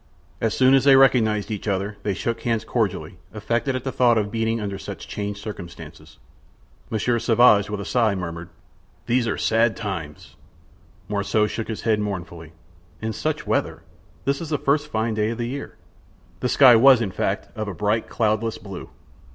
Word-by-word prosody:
As 110 Hz, -, 0 dB
soon 130 Hz, 0 st, +5 dB
as 135 Hz, -, +5 dB
they 140 Hz, -1 st, +7 dB
recognized 115 Hz, -6 st, +3 dB
each 105 Hz, 0 st, -5 dB
other 100 Hz, +1 st, -1 dB
they 100 Hz, -2 st, -2 dB
shook 115 Hz, -1 st, -3 dB
hands 115 Hz, -2 st, -1 dB
cordially, 100 Hz, -4 st, -2 dB, 0.2 s
affected 115 Hz, +5 st, -1 dB
at 130 Hz, -, -3 dB
the 130 Hz, -, -3 dB
thought 120 Hz, -2 st, +3 dB
of 105 Hz, -1 st, -1 dB
meeting 115 Hz, 0 st, 0 dB
under 100 Hz, -2 st, -4 dB
such -, -, -8 dB
changed 100 Hz, 0 st, -4 dB
circumstances. 85 Hz, -6 st, -10 dB, 0.7 s
Monsieur 120 Hz, +2 st, 0 dB
Sauvage, 110 Hz, -4 st, +4 dB
with 105 Hz, -1 st, -4 dB
a 100 Hz, -, -5 dB
sigh, 115 Hz, -5 st, +1 dB
murmured: 85 Hz, -2 st, -6 dB, 0.6 s
"These 120 Hz, 0 st, +1 dB
are 100 Hz, -, -1 dB
sad 115 Hz, 0 st, +2 dB
times!" 85 Hz, -8 st, -6 dB, 0.7 s
Morissot 105 Hz, +1 st, 0 dB
shook 115 Hz, -, -4 dB
his 110 Hz, -, -5 dB
head 110 Hz, -2 st, +2 dB
mournfully. 85 Hz, -5 st, -5 dB, 0.5 s
"And 110 Hz, 0 st, -3 dB
such -, -, -3 dB
weather! -, -, -1 dB, 0.4 s
This 140 Hz, +3 st, 0 dB
is 165 Hz, -, -6 dB
the 150 Hz, -, 0 dB
first 145 Hz, +2 st, +1 dB
fine 110 Hz, -4 st, -1 dB
day 105 Hz, 0 st, 0 dB
of 115 Hz, -, -4 dB
the 120 Hz, -, -2 dB
year." 140 Hz, +4 st, -6 dB, 0.6 s
The 125 Hz, -, -1 dB
sky 130 Hz, -2 st, +7 dB
was, 130 Hz, +2 st, +7 dB
in 110 Hz, -5 st, -2 dB
fact, -, -, -3 dB
of 110 Hz, -1 st, -4 dB
a 100 Hz, -, -4 dB
bright, 105 Hz, +2 st, -1 dB
cloudless 110 Hz, 0 st, 0 dB
blue. 95 Hz, -3 st, -9 dB
110 Hz, 180 wpm, -23 LUFS, 100-120 Hz, 0.7 s, they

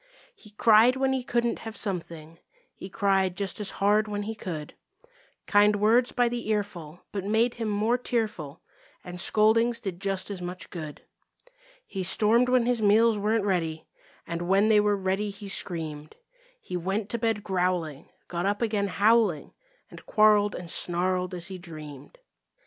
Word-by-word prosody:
He 210 Hz, -, -15 dB
cried 220 Hz, +3 st, +5 dB
when 265 Hz, 0 st, +1 dB
he 260 Hz, -1 st, -2 dB
couldn't 235 Hz, -1 st, -1 dB
have 225 Hz, -1 st, -8 dB
something; 165 Hz, -5 st, -6 dB, 0.3 s
He 190 Hz, -, -10 dB
cried 190 Hz, -2 st, +1 dB
just 200 Hz, 0 st, -3 dB
as 210 Hz, -, 0 dB
hard 210 Hz, +2 st, +2 dB
when 205 Hz, -1 st, -3 dB
he 220 Hz, +2 st, -4 dB
could; 165 Hz, -8 st, -7 dB, 0.7 s
Kind 205 Hz, 0 st, +4 dB
words 225 Hz, +4 st, +3 dB
by 245 Hz, -1 st, +2 dB
the 235 Hz, -2 st, -4 dB
earful 180 Hz, -6 st, -3 dB
but 200 Hz, -2 st, -4 dB
made 220 Hz, +4 st, +1 dB
him 225 Hz, -2 st, -4 dB
more 215 Hz, +4 st, +1 dB
tearful, 210 Hz, -, -3 dB, 0.4 s
And 180 Hz, 0 st, -8 dB
scoldings 230 Hz, +4 st, +3 dB
did 195 Hz, -5 st, -6 dB
just 195 Hz, 0 st, -2 dB
as 190 Hz, -3 st, -6 dB
much 180 Hz, +1 st, -6 dB
good. 155 Hz, -4 st, -8 dB, 0.8 s
He 195 Hz, -, -5 dB
stormed 220 Hz, +6 st, +3 dB
when 250 Hz, -2 st, +3 dB
his 245 Hz, -2 st, 0 dB
meals 215 Hz, +1 st, +4 dB
weren't 210 Hz, +1 st, 0 dB
ready, 165 Hz, -5 st, -1 dB, 0.4 s
And 170 Hz, 0 st, -4 dB
when 200 Hz, +3 st, +4 dB
they 215 Hz, -1 st, +5 dB
were 205 Hz, 0 st, +2 dB
ready, 195 Hz, +2 st, -1 dB
he 200 Hz, 0 st, -9 dB
screamed. 155 Hz, -6 st, -3 dB, 0.4 s
He 180 Hz, -, -7 dB
went 195 Hz, +4 st, -2 dB
to 235 Hz, -, -2 dB
bed 225 Hz, -2 st, -1 dB
growling, 180 Hz, -6 st, -2 dB, 0.2 s
got 175 Hz, +2 st, -2 dB
up 205 Hz, +3 st, -1 dB
again 210 Hz, -3 st, 0 dB
howling 205 Hz, -4 st, +2 dB, 0.4 s
And -, -, -12 dB
quarreled 210 Hz, -1 st, +4 dB
and 175 Hz, -2 st, -6 dB
snarled 180 Hz, +1 st, 0 dB
as 175 Hz, +1 st, -6 dB
he 190 Hz, -1 st, -7 dB
dreamed. 150 Hz, -5 st, -11 dB
205 Hz, 165 wpm, -26 LUFS, 180-220 Hz, 0.8 s, cried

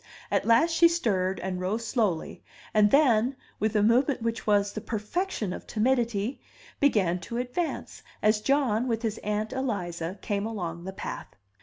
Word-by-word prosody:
At -, -, +1 dB
last 235 Hz, +9 st, +5 dB
she 335 Hz, +1 st, +7 dB
stirred, 195 Hz, -, 0 dB
and 185 Hz, 0 st, -3 dB
rose 215 Hz, +5 st, -2 dB
slowly, 215 Hz, -9 st, -1 dB, 0.3 s
and 210 Hz, -1 st, +5 dB
then, 255 Hz, -2 st, +4 dB, 0.2 s
with 220 Hz, 0 st, 0 dB
a 210 Hz, -, +4 dB
movement 240 Hz, +3 st, +3 dB
which 230 Hz, -1 st, -2 dB
was 205 Hz, -1 st, +3 dB
the 215 Hz, -, -4 dB
perfection 220 Hz, -, -2 dB
of -, -, -9 dB
timidity, 235 Hz, 0 st, 0 dB, 0.4 s
began 195 Hz, -11 st, +2 dB
to 235 Hz, +7 st, -6 dB
advance, 250 Hz, +8 st, -3 dB, 0.2 s
as 215 Hz, 0 st, +2 dB
John, 255 Hz, -3 st, +2 dB
with 230 Hz, -1 st, -1 dB
his 220 Hz, -1 st, -2 dB
Aunt 210 Hz, +2 st, -2 dB
Eliza, 185 Hz, -9 st, -3 dB
came 205 Hz, +1 st, -1 dB
along 175 Hz, -6 st, -5 dB
the 190 Hz, -, -4 dB
path. -, -, -6 dB
220 Hz, 160 wpm, -27 LUFS, 200-250 Hz, 0.4 s, she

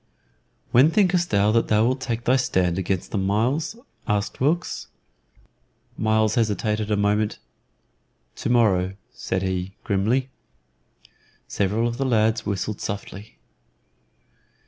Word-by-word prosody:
"When 130 Hz, +6 st, +6 dB
thinkest 180 Hz, -1 st, +2 dB
thou 100 Hz, +1 st, +3 dB
that 115 Hz, +1 st, +2 dB
thou 110 Hz, +1 st, +3 dB
wilt 130 Hz, +2 st, 0 dB
take 115 Hz, -1 st, -3 dB
thy 125 Hz, -, +3 dB
stand 95 Hz, -8 st, +1 dB
against 95 Hz, -1 st, -2 dB
them, 100 Hz, -3 st, -1 dB
Myles?" 125 Hz, -, 0 dB, 0.3 s
asked 105 Hz, -2 st, -1 dB
Wilkes. 160 Hz, +5 st, 0 dB, 1.1 s
Myles 110 Hz, 0 st, +2 dB
hesitated 105 Hz, -1 st, 0 dB
a 105 Hz, -, +1 dB
moment. 105 Hz, +1 st, +1 dB, 1.0 s
"To -, -, -3 dB
morrow," 95 Hz, -6 st, +2 dB, 0.2 s
said 95 Hz, 0 st, -3 dB
he, 95 Hz, 0 st, -3 dB
grimly. 120 Hz, +6 st, 0 dB, 1.2 s
Several 105 Hz, +4 st, 0 dB
of 120 Hz, 0 st, -4 dB
the 135 Hz, -, -1 dB
lads 110 Hz, -1 st, +1 dB
whistled 100 Hz, +1 st, -3 dB
softly. 100 Hz, +1 st, -6 dB
110 Hz, 120 wpm, -23 LUFS, 100-120 Hz, 1.2 s, When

